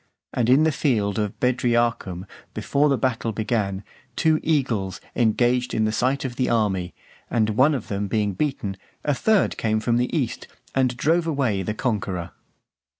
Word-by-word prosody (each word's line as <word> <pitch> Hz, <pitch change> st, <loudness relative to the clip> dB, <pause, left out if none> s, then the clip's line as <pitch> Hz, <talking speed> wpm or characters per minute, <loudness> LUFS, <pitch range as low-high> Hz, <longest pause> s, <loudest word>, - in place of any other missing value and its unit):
And 120 Hz, -1 st, +1 dB
in 135 Hz, +5 st, +6 dB
the 160 Hz, -, +3 dB
field 110 Hz, -8 st, 0 dB
of 105 Hz, -2 st, -3 dB
Bedriacum, 120 Hz, -7 st, 0 dB, 0.3 s
before 145 Hz, +2 st, +1 dB
the 135 Hz, -, +2 dB
battle 120 Hz, -3 st, -1 dB
began, 105 Hz, -2 st, -1 dB, 0.3 s
two 155 Hz, -1 st, +3 dB
eagles 120 Hz, -, 0 dB, 0.2 s
engaged 120 Hz, +2 st, +2 dB
in 110 Hz, -, +2 dB
the 110 Hz, -, +1 dB
sight 130 Hz, +5 st, 0 dB
of 125 Hz, -2 st, -5 dB
the 130 Hz, -, +1 dB
army; 95 Hz, -6 st, 0 dB, 0.3 s
and 110 Hz, -2 st, +1 dB
one 135 Hz, +7 st, +4 dB
of 125 Hz, -, -5 dB
them 100 Hz, 0 st, -2 dB
being 105 Hz, -1 st, 0 dB
beaten, 105 Hz, -6 st, -2 dB, 0.3 s
a 145 Hz, -, +1 dB
third 215 Hz, +8 st, +2 dB
came 110 Hz, -1 st, +1 dB
from 115 Hz, +2 st, +1 dB
the 125 Hz, +1 st, +1 dB
east, 130 Hz, -6 st, -2 dB, 0.3 s
and 130 Hz, -2 st, +1 dB
drove 165 Hz, +5 st, +2 dB
away 130 Hz, -11 st, 0 dB
the 105 Hz, +3 st, -3 dB
conqueror. 95 Hz, -8 st, -2 dB
120 Hz, 165 wpm, -23 LUFS, 105-135 Hz, 0.3 s, in